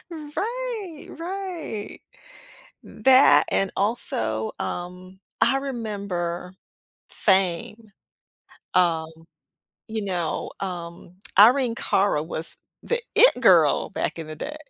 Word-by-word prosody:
Right, 395 +3 -5 0.2
right. 360 - -5 0.9
That 265 +1 +5
and 195 -1 +1
also, 110 - 0
um, 180 +1 -6 0.2
I 270 - +4
remember, 200 -9 -4 0.6
"Fame." 195 +3 0 0.8
Um, 165 -3 +2 0.8
you 220 -1 -3
know, 175 -5 -2
um, 175 -2 -7 0.2
Irene 240 +3 +6
Cara 195 -9 +1
was 160 0 -2 0.3
the 480 0 -1 0.2
it - - +6
girl - - +4
back - - -3
in 160 - -6
the 155 - -7
day, 300 - -6
200 Hz, 95 wpm, -24 LUFS, 175-275 Hz, 0.9 s, Irene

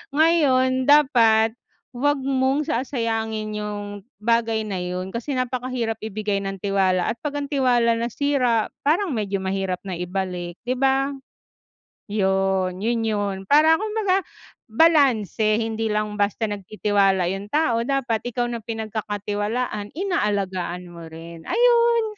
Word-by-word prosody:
Ngayon 260 -5 +3
dapat 230 -7 +5 0.4
wag 275 +2 0
mong 270 +2 +1
sasayangin 225 -4 -2
yung 205 0 -6
bagay 225 0 +1
na 200 -4 -4
yun. 180 +1 -4
Kasi 255 +4 -4
napakahirap 250 -3 -2
ibigay 210 -1 -2
ng 195 0 -4
tiwala 190 -2 +2
at 235 - -7
pag 290 +1 -4
ang 285 0 -4
tiwala 240 -4 +2
nasira 245 -2 0
parang 325 +4 +1
medyo 200 -4 -2
mahirap 190 -1 -2
na 185 -3 -5
ibalik 180 -1 -4
'di 250 +1 -2
ba? 270 +1 +2 1.0
Yun, 190 -2 0
yun 235 0 +1
yun 205 -2 -1
para 315 - +5
kumbaga 425 -3 +1 0.5
balanse 225 - +3
hindi 225 0 -1
lang 210 0 -2
basta 205 +2 0
nagtitiwala 195 -2 +1
yung 195 +1 -5
tao 240 -2 +1
dapat 265 -5 0
ikaw 245 0 -1
na 235 - -3
pinagkakatiwalaan 215 0 -3
inaalagaan 200 - -1
mo 170 -1 -10
rin 165 0 -11
ayun. 470 -1 +4
220 Hz, 125 wpm, -23 LUFS, 200-260 Hz, 1.0 s, dapat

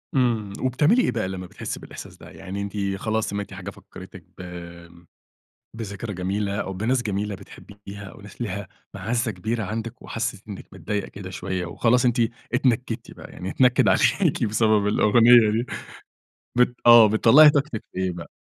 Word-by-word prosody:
إمم 115 -6 +1
وبتعملي 150 - +3
إيه - - +1
بقى 110 -5 -2
لمّا 95 -1 -6
بتحسّي - - -6
بالإحساس - - -11
ده، - - -13
يعني 95 +1 -7
أنتِ 100 +1 -6 0.2
خلاص 110 +2 -2
سمعتِ 100 0 -5
حاجة 95 0 -7
فكرتِك - - -13
ب - - -9 1.4
بذكرى 105 -1 -6
جميلة 100 +2 -2
أو 95 - -4
بناس 115 +7 0
جميلة 105 -1 -2
بتحبيها 100 +1 -12
أو 100 - -12
ناس 100 +3 -14
ليها 100 -4 -4 0.3
مَعزّة 120 0 -1
كبيرة 110 +4 -3
عندِك 115 +4 -5
وحسيتِ 110 -3 -4
إنّك 100 - -8
متضايقة 105 -1 -4
كده 95 -2 -9
شويّة 90 -1 -4
وخلاص 120 +8 +2
أنتِ 120 0 +2 0.3
اتنكدتِ 125 -2 0
بقى - - -12
يعني 90 +1 -6
اتنكد 125 +2 +3
عليكِ - - +2
بسبب 110 -1 +2
الأغنية 115 +2 +5
دي 115 +3 -1 0.9
بت 125 0 +3
آه 120 -2 +9
بتطلعي 120 +8 +7
طاقتِك 140 -6 -1
في - - -9
إيه 95 -1 0
بقى؟ 85 -1 -9
105 Hz, 160 wpm, -23 LUFS, 100-120 Hz, 1.4 s, آه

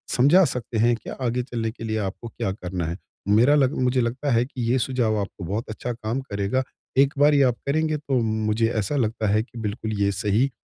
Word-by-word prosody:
समझा 150 +10 +6
सकते 120 -2 -4
हैं 115 +2 +4
कि - - -10
आगे 125 -1 -2
चलने 115 -3 -3
के 115 - -11
लिए 110 -1 -1
आपको 105 +3 -4
क्या 100 -3 -3
करना 90 -3 -4
हैं। 85 +2 -4 0.3
मेरा 115 +8 +5
लग 135 0 +3
मुझे 125 0 +2
लगता 125 +4 -1
है 120 +1 +3
कि 130 -2 -7
ये 130 - +3
सुझाव 120 -4 0
आपको 100 -1 -7
बहुत 105 +6 -3
अच्छा 120 +3 -4
काम 115 +3 -3
करेगा। 100 +6 0 0.3
एक 140 +1 +5
बार 145 +1 +6
ये 140 -1 +5
आप 125 -2 +3
करेंगे 155 +1 +1
तो 135 -3 -1
मुझे 110 0 +1
ऐसा 145 +9 -2
लगता 110 -3 0
हैं 110 +1 +3
कि 120 0 -14
बिल्कुल 110 0 -3
ये 100 0 +3
सही 110 +7 +2
115 Hz, 220 wpm, -24 LUFS, 110-130 Hz, 0.3 s, समझा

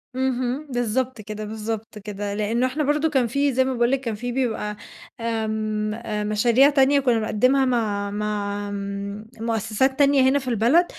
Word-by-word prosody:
اهم، 260 +2 -1
بالضبط 245 0 -1
كده، 215 0 -6
بالضبط 220 0 -5
كده، 205 0 -5
لأنه 215 +4 0
إحنا 300 +4 -2
برضو 300 +2 +1
كان 265 -5 +2
في 280 +3 +1
زي 260 +1 +3
ما 260 - -1
باقول 240 0 +2
لِك 270 - +2
كان 230 -5 -3
في 245 +3 -4
بيبقى 220 -5 -2 0.4
آمم، 220 -2 -2 0.4
مشاريع 235 +6 +4
تانية 280 0 +4
كنا 245 -4 +2
بنقدمها 255 +5 +2
مع 210 -5 0
مع 205 -1 -2
آمم، 200 +1 -5
مؤسسات 225 +4 0
تانية 280 -1 +5
هنا 285 - +2
في 260 - -10
البلد، 245 - +4
230 Hz, 165 wpm, -23 LUFS, 210-265 Hz, 0.4 s, تانية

